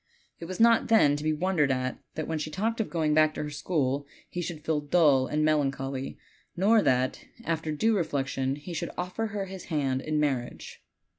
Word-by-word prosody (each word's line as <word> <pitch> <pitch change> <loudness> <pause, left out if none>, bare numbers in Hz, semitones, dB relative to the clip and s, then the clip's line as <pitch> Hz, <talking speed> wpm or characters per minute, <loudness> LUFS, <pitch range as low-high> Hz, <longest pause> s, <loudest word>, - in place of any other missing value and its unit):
It 170 - -7
was 185 +1 -6
not, 230 0 +5
then, 180 -11 +5
to 145 - -5
be 155 - +1
wondered 155 -2 +1
at 130 0 -2 0.2
that 155 - -3
when 160 -1 -2
she 155 - -3
talked 220 +8 -1
of 220 - -3
going 155 -3 +1
back 155 0 +4
to - - -3
her 150 - -5
school 145 -3 -1 0.2
he 175 - -3
should 160 -3 -6
feel 155 -2 +1
dull 145 -4 +4
and 155 0 0
melancholy, 135 -3 -1 0.4
nor 210 +4 +5
that 130 -5 +1 0.2
after 160 -3 -2
due 220 +9 +2
reflection, 135 -6 -1
he 150 +5 -8
should 165 - -3
offer 180 +5 -2
her 205 -2 -3
his 190 -1 -9
hand 135 -5 -1
,n 155 +1 -1
mar 145 -3 +2
riage. 120 0 -9
155 Hz, 205 wpm, -28 LUFS, 140-180 Hz, 0.4 s, not